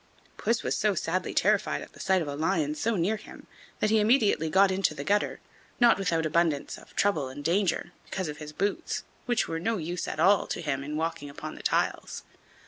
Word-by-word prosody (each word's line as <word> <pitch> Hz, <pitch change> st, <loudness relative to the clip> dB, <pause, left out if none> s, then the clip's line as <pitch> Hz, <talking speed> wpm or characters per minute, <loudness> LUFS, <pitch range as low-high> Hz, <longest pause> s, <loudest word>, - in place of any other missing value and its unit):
Puss 230 Hz, +1 st, 0 dB
was -, -, 0 dB
so 210 Hz, -2 st, +1 dB
sadly 180 Hz, +2 st, -1 dB
terrified 210 Hz, 0 st, +2 dB
at -, -, -13 dB
the -, -, -16 dB
sight 190 Hz, -2 st, +2 dB
of -, -, -7 dB
a 145 Hz, -, -3 dB
lion 155 Hz, -1 st, 0 dB
so 215 Hz, +9 st, 0 dB
near 195 Hz, +5 st, +1 dB
him 210 Hz, -, -13 dB, 0.3 s
that 215 Hz, -, +1 dB
he 220 Hz, -, +5 dB
immediately 210 Hz, -, +3 dB
got 190 Hz, +3 st, +5 dB
into 190 Hz, -4 st, +1 dB
the 140 Hz, -, -5 dB
gutter, 205 Hz, +7 st, +1 dB, 0.4 s
not 240 Hz, -4 st, +6 dB
without 165 Hz, -4 st, 0 dB
abundance 155 Hz, -2 st, +1 dB
of -, -, -16 dB
trouble 165 Hz, -10 st, +2 dB
and 145 Hz, +2 st, -8 dB
danger, 175 Hz, +2 st, +1 dB
because 185 Hz, -2 st, -3 dB
of 150 Hz, -1 st, -5 dB
his 150 Hz, -1 st, -7 dB
boots, 200 Hz, -, -2 dB, 0.2 s
which 240 Hz, -2 st, +1 dB
were 165 Hz, -, -2 dB
of -, -, -5 dB
no 225 Hz, +4 st, 0 dB
use 175 Hz, +1 st, -3 dB
at -, -, -4 dB
all 190 Hz, +4 st, +4 dB
to -, -, -3 dB
him 140 Hz, -4 st, -2 dB
in 150 Hz, +2 st, -4 dB
walking 165 Hz, -2 st, -3 dB
upon 155 Hz, +2 st, -7 dB
the -, -, -10 dB
tiles. -, -, -1 dB
175 Hz, 220 wpm, -28 LUFS, 155-205 Hz, 0.4 s, not